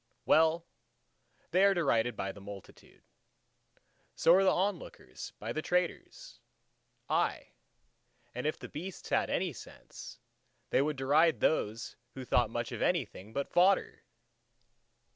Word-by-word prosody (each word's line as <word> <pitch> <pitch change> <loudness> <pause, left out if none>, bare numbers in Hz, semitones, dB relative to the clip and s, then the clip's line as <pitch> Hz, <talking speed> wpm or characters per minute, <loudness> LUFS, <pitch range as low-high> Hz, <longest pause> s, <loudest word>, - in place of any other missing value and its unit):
Well, 160 +1 +3 0.9
they 185 +3 +4
are 200 0 +5
derided 120 -8 +1
by 95 -1 -3
the 100 - -13
multitude. 100 -1 -12 1.1
So 165 - +5
are 190 +2 +5
the 195 +1 +3
lookers 65 - -10
on - - -42
by 110 +3 -4
the 155 - -2
traders: 180 +1 -3 0.7
aye, - - 0 0.8
and 125 +4 -3
if 155 - -1
the - - -9
beasts 180 +5 -8
had - - +1
any 180 -3 -1
sense, 110 - -11 0.5
they - - +4
would 150 +1 0
deride 150 +5 +3
those 115 -6 -1 0.2
who 130 -1 -7
thought - - +2
much - - -4
of - - -5
anything 100 +4 -1
but 140 +4 -2
fodder! 185 +2 +3
155 Hz, 135 wpm, -31 LUFS, 115-175 Hz, 1.1 s, are